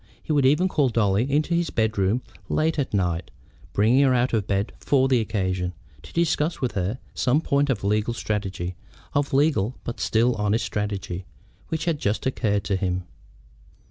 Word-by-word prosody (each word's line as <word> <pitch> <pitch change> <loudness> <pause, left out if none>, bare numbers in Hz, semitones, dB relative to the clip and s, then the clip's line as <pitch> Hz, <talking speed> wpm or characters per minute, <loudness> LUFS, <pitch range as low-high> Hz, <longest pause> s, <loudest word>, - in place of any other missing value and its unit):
He - - -4
would 140 -3 +4
even 150 +7 +4
call 145 -7 +2
Dolly 115 +2 +1
into 150 +4 +1
his 170 0 +1
bedroom 110 +1 +1 0.3
late 160 0 +1
at 140 - -1
night, 90 -4 0 0.4
bringing 115 +7 +4
her 130 -2 +4
out 125 +1 +1
of 105 -3 +1
bed 100 +2 0
for 135 -2 +3
the 130 -2 +3
occasion, 95 -5 -1 0.3
to 75 - -13
discuss 165 -1 +1
with 125 -3 -1
her 95 +4 -2 0.2
some 130 +4 +2
point 140 -2 +1
of 115 -7 0
legal 105 +3 +1
strategy, 95 -5 -3 0.4
of 145 0 +1
legal 135 -5 +2
but 120 - -5
still 115 +3 +2
honest 105 +1 0
strategy, 100 -3 -3 0.4
which 160 +1 -2
had 165 -4 0
just 105 -3 -1
occurred 105 -6 0
to 100 - 0
him. 90 -1 -1
115 Hz, 175 wpm, -24 LUFS, 100-140 Hz, 0.4 s, would